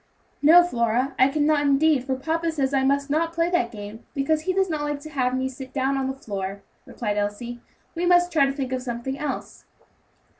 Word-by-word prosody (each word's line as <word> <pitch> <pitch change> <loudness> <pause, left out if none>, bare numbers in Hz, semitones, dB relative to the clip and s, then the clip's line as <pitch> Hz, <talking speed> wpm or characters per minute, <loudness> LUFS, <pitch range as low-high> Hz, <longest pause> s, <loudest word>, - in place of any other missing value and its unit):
"No, 330 +4 +8
Flora, 245 -3 0
I 260 - +7
cannot 295 +1 +2
indeed, 285 -1 +3
for 265 -1 -1
papa 325 +5 -1
says 280 -3 -1
I 270 -1 +2
must 280 +1 +1
not 330 +2 0
play 335 +1 0
that 245 -10 +1
game, 210 0 -9
because 300 +3 +1
he 370 - -1
does 385 0 +2
not 310 -4 -2
like 295 -1 -2
to 310 +1 -10
have 255 -3 0
me 260 0 -1
sit 260 0 -9
down 270 0 0
on 270 -1 -1
the 265 - -3
floor," 200 -5 -5 0.2
replied 210 -3 -3
Elsie. 220 +4 -3 0.3
"We 350 +1 -1
must 355 0 +4
try 280 -4 +4
to - - 0
think 270 -2 -4
of 255 - -2
something 250 +2 -4
else." 295 -2 -5
275 Hz, 215 wpm, -24 LUFS, 250-310 Hz, 0.3 s, No